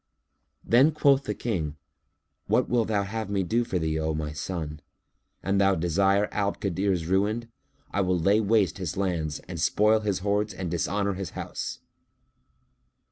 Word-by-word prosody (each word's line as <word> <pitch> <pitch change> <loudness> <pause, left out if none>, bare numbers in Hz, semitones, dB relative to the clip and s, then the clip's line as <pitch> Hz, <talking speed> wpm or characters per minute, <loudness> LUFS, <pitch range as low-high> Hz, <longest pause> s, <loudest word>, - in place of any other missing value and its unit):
Then 135 +7 +5
quoth 140 -2 +3
the 105 - -2
King, 80 -11 -2 0.7
"What - - +2
wilt 120 -3 +1
thou 105 -2 +1
have 110 +1 -4
me 100 -2 0
do 115 +7 +1
for 95 - -2
thee, 80 -2 -1
O 80 0 -1
my 75 -1 -3
son? 75 -1 -5 0.6
An 95 0 +1
thou 100 -1 +4
desire 95 +4 +2
Abd - - -14
al 100 -1 +1
Kadir's 95 -3 -1
ruin, 105 +6 0 0.4
I 100 - +1
will 90 -1 +1
lay 100 +6 +3
waste 100 -5 +2
his 90 -3 -4
lands 85 -6 -1
and - - -6
spoil 110 +1 +3
his 105 -3 -1
hoards 105 0 0
and 90 -2 -4
dishonour 100 +4 0
his 95 -2 -5
house." - - -5
100 Hz, 165 wpm, -27 LUFS, 85-105 Hz, 0.7 s, Then